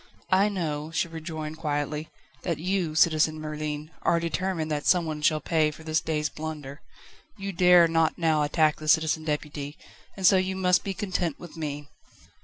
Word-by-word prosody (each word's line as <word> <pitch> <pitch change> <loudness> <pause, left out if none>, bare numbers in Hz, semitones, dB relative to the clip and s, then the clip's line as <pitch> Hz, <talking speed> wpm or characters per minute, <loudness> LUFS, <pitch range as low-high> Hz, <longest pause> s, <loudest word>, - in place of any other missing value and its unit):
"I 195 +2 +4
know," 155 -6 -3
she 165 +1 -1
rejoined 160 -1 -6
quietly, 150 0 -2 0.3
"that 170 -4 -2
you, 175 -1 -1
Citizen 155 -1 +3
Merlin, 150 0 -5
are 170 - +2
determined 170 -1 -2
that 150 -1 -2
someone 160 -4 +2
shall 155 0 +3
pay 155 -1 +1
for 150 +1 -11
this 155 0 0
day's 150 -1 -1
blunder. 150 -2 -7 0.6
You 195 0 -4
dare 180 -1 +6
not 165 -1 +1
now 160 -3 +2
attack 155 +1 +2
the 155 - -8
Citizen 160 0 +3
Deputy, 150 -1 -4 0.4
and 190 - -2
so 190 - +7
you 185 0 0
must 180 -1 +2
be 195 -1 -3
content 180 -6 -2
with 175 - -11
me." 145 -2 -5
160 Hz, 170 wpm, -26 LUFS, 150-175 Hz, 0.6 s, so